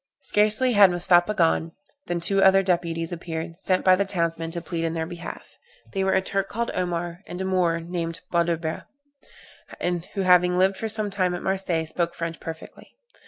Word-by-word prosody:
Scarcely 215 +4 +4
had 200 -2 +7
Mustapha 175 +3 +3
gone, 165 -1 +1 0.3
than 175 0 -2
two 195 +3 +2
other 195 0 +5
deputies 170 -2 -1
appeared, 165 0 -6
sent 185 -1 0
by 185 -1 +7
the 200 - +1
townsmen 170 -4 -2
to 170 +1 -2
plead 170 0 -4
in 165 0 -1
their 160 -1 -2
behalf. 175 +1 -9 0.3
They 195 -1 0
were 190 - +1
a 190 - +2
Turk 195 0 -2
called 235 +2 -3
Omar, 175 -1 -3
and 175 - -7
a 190 - -2
Moor 180 -3 +1
named 165 -1 -4
Bouderba, 170 -2 -1 0.9
who 175 +3 -3
having 180 -1 +4
lived 190 +1 +2
for 225 - -4
some 215 -1 -3
time 185 -2 0
at 175 - -7
Marseilles, 180 -4 -1
spoke 170 +1 -2
French 165 0 -5
perfectly. 160 -1 -10
175 Hz, 180 wpm, -24 LUFS, 165-190 Hz, 0.9 s, had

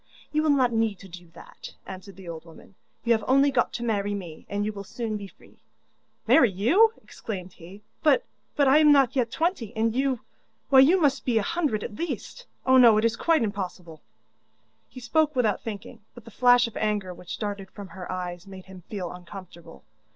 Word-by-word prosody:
'You 305 - +1
will 310 - +1
not 260 -4 +3
need 225 -3 0
to 195 - -11
do 175 -1 -12
that,' - - -12
answered 190 0 -10
the 190 -1 -13
old 165 -1 -7
woman, 175 +6 -16 0.3
'you 235 - 0
have 220 -2 +3
only 275 +2 +4
got 250 -2 +1
to 240 - -4
marry 205 -3 -1
me, 175 -5 -9
and 205 0 -2
you 215 - -3
will 200 -1 -7
soon 220 +2 -5
be 200 -1 -6
free.' - - -22 0.7
'Marry 255 -8 +5
you?' 280 - +3
exclaimed 185 -4 -7
he, 185 +5 -14 0.2
'but 485 +11 +3 0.3
but 285 -3 +3
I 275 +3 +6
am 300 -1 +6
not 275 -2 +4
yet 245 -3 +1
twenty, 315 - -2
and 225 0 +1
you 265 -1 0 0.5
why, 270 -2 +7
you 320 +8 +6
must 280 -4 +1
be 240 -3 +1
a 220 - +2
hundred 280 -7 -1
at - - -6
least! 345 +8 -6 0.2
Oh, 260 0 +5
no, 235 -4 +7
it 215 - +2
is 230 0 +1
quite 320 +2 +2
impossible.' 180 -6 -5 0.9
He 255 - -11
spoke 305 +5 +1
without 225 -5 +1
thinking, 225 +2 -8 0.2
but 240 -2 -13
the 230 - -12
flash 245 +2 +4
of 230 - -11
anger 210 -4 -1
which 180 0 -8
darted 200 -2 -5
from 200 -1 -10
her 185 -1 -8
eyes 180 0 -5
made 190 -1 -11
him 190 -1 -12
feel 190 -5 -5
uncomfortable. 175 -2 -12
220 Hz, 205 wpm, -25 LUFS, 190-260 Hz, 0.9 s, why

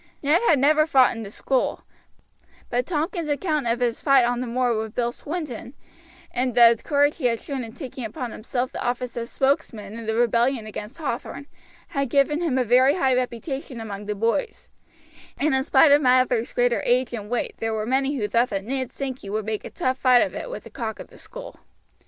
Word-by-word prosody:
Ned 300 +6 +3
had 310 - +5
never 305 +3 +4
fought 265 -6 +4
in 225 - -6
the 205 - -7
school, 260 +5 -1 0.9
but 245 +1 0
Tompkins' 330 0 -2
account 300 -2 -1
of 235 +2 0
his 240 -2 0
fight 275 -4 +5
on 245 0 -1
the 255 - -3
moor 245 0 +1
with 220 0 -4
Bill 240 -1 0
Swinton, 285 -4 -6 0.6
and 250 -1 -1
the 235 -1 +8
courage 290 0 +2
he 265 -7 +1
had 230 -1 0
shown 275 -3 -5
in 225 -1 -9
taking 260 -2 -7
upon 240 +2 -5
himself 245 +4 -3
the - - -5
office 245 0 -2
of 235 0 -4
spokesman 225 -7 -1
in 230 -1 -8
the 220 - 0
rebellion 235 +1 +2
against 215 +4 -8
Hathorn, 285 -2 -4 0.4
had 275 -3 -2
given 285 +4 +2
him 310 -7 0
a 255 - +3
very 255 +5 +4
high 265 -8 +2
reputation 255 +1 -3
among 205 -2 -7
the 210 - -2
boys; 230 - -2 0.7
and 300 0 +1
in 265 0 +2
spite 285 +1 +5
of 290 +1 +6
Mather's 250 -3 +3
greater 245 -1 +1
age 250 0 +1
and 210 -3 -6
weight 245 0 -2
there 225 0 -1
were 215 0 -2
many 270 +4 +1
who 215 -6 -1
thought 235 +3 +2
that 195 -3 -3
Ned 260 +1 -2
Sankey 260 -7 -5
would 215 +1 -2
make 215 -1 -3
a - - -7
tough 255 +1 -2
fight 250 -2 +5
of - - -4
it - - -6
with - - -7
the - - -13
cock 225 -4 -5
of - - -9
the - - -16
school. - - -10
250 Hz, 210 wpm, -24 LUFS, 230-275 Hz, 0.9 s, the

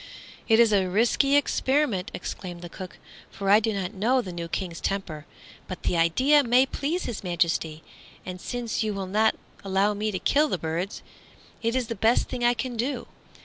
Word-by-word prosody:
"It 225 -1 +5
is 230 -2 +5
a 190 -2 +2
risky 240 +8 +3
experiment," 265 -7 +1
exclaimed 180 -1 -7
the 175 - -7
cook, 185 +1 -9 0.3
"for 195 0 -1
I 210 - +8
do 225 0 0
not 195 -1 -3
know 230 +6 +2
the 185 -7 -4
new 170 -1 -5
King's 170 0 -4
temper. 175 -5 -3 0.4
But 185 - -7
the - - 0
idea 260 - +4
may 250 +1 +4
please 305 +6 -2
His 235 - -5
Majesty, 165 -3 -1 0.4
and 180 0 -7
since 240 -2 -3
you 215 -2 -1
will 195 -1 -3
not 215 +4 +2 0.3
allow 195 +2 +2
me 210 +1 -2
to 195 - -2
kill 295 - +2
the 185 - -1
birds, 165 +4 -4 0.6
it 230 +1 0
is 255 -1 +1
the 230 - -4
best 225 +3 +2
thing 250 -1 -4
I 240 0 +4
can 250 0 -4
do. 245 +2 -2
210 Hz, 190 wpm, -26 LUFS, 180-245 Hz, 0.6 s, I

